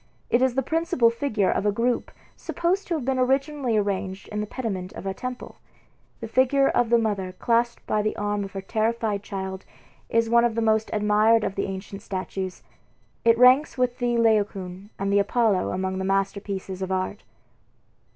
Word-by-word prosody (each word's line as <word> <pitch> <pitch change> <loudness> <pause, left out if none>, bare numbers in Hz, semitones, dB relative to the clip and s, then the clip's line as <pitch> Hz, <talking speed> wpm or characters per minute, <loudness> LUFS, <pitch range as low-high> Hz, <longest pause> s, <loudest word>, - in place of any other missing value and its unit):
It 240 - +4
is 260 -2 +2
the 270 - +1
principal 320 -6 +2
figure 230 -5 0
of - - 0
a 205 - +2
group 235 +4 0 0.3
supposed 350 +4 -1
to 340 - 0
have 290 -6 -3
been 265 -1 0
originally 265 -2 +1
arranged 195 -2 -2
in 210 0 -3
the 210 - -4
pediment 200 -7 -4
of - - -8
a 195 - -1
temple. 250 +4 -7 0.6
The 225 - -4
figure 265 +4 +3
of 245 -2 +1
the 235 - +5
mother 200 -5 -1
clasped 235 +4 0
by 215 - +1
the 215 0 -1
arm 205 0 -1
of 195 - -8
her 195 - -4
terrified 220 0 -1
child 190 -1 -5 0.5
is 230 0 +2
one 235 +1 +4
of 235 -2 +1
the - - 0
most 220 0 +2
admired 210 +1 +3
of - - -1
the 200 - -2
ancient 195 +1 -7
statues. 190 -1 -5 0.6
It 230 0 +5
ranks 255 +4 +5
with 250 0 0
the 240 -1 +1
Laocoon 200 -4 0
and 195 +1 -1
the 200 - +5
Apollo 205 -1 +2
among 190 0 -2
the - - -2
masterpieces 195 -1 -2
of 190 0 -3
art. 190 +2 -2
215 Hz, 185 wpm, -25 LUFS, 195-240 Hz, 0.6 s, the